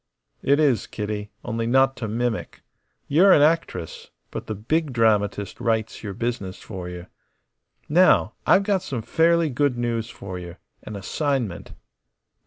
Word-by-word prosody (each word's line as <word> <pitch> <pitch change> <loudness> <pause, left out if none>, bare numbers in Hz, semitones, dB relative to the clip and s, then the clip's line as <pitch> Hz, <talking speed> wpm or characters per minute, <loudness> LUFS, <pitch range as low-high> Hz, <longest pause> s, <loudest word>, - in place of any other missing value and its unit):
"It 140 +2 +3
is, 140 -7 +2
Kitty; 105 0 -4 0.2
only 115 -1 -2
not 135 +2 +4
to 115 - -4
mimic. 115 +1 -3 0.4
You're 180 +7 +5
an 145 - +7
actress, 155 - -1 0.2
but - - -6
the 110 - -3
Big 145 +8 -1
Dramatist 105 -4 +1
writes 110 -1 -1
your 100 -3 -5
business 115 -5 -3
for 90 -4 -7
you. 90 0 -8 0.8
Now, 180 +5 +4
I've 200 - +5
got 200 -2 +1
some 125 -10 -4
fairly 165 +4 +2
good 130 -1 +1
news 120 -1 -2
for 95 -5 -7
you. 85 -1 -9 0.3
An 110 - -8
assignment." 120 - -2
115 Hz, 145 wpm, -24 LUFS, 105-145 Hz, 0.8 s, an